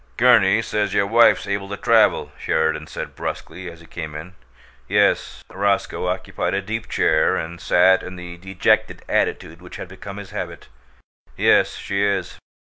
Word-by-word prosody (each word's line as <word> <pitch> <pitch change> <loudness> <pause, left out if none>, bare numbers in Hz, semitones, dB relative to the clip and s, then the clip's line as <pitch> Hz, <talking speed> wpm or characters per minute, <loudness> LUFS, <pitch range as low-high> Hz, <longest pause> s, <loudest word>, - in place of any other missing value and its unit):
"Gurney 110 -4 +5
says 105 -3 -1
your 100 - +3
wife's 115 +3 +4
able 100 -1 -3
to 100 - -5
travel," - - +3
Sheridan 80 -1 0
said - - -7
brusquely, 90 +2 -6
as 85 -1 -13
he - - -15
came 80 -3 -7
in. 80 +4 -8 0.5
"Yes." 60 0 +1
Roscoe 100 -1 -1
occupied 90 +1 -2
a 100 - 0
deep 110 +2 -5
chair 80 0 +2
and 85 +1 -5
sat 95 +1 +4
in 95 - -8
the 90 -1 -9
dejected 95 +1 0
attitude 80 +1 -1
which 90 - -11
had - - -7
become 100 +2 -9
his 100 -2 -9
habit. 85 -8 -6 0.7
"Yes, - - +3
she 100 0 -2
is." 100 -3 -1
95 Hz, 160 wpm, -21 LUFS, 85-100 Hz, 0.7 s, Gurney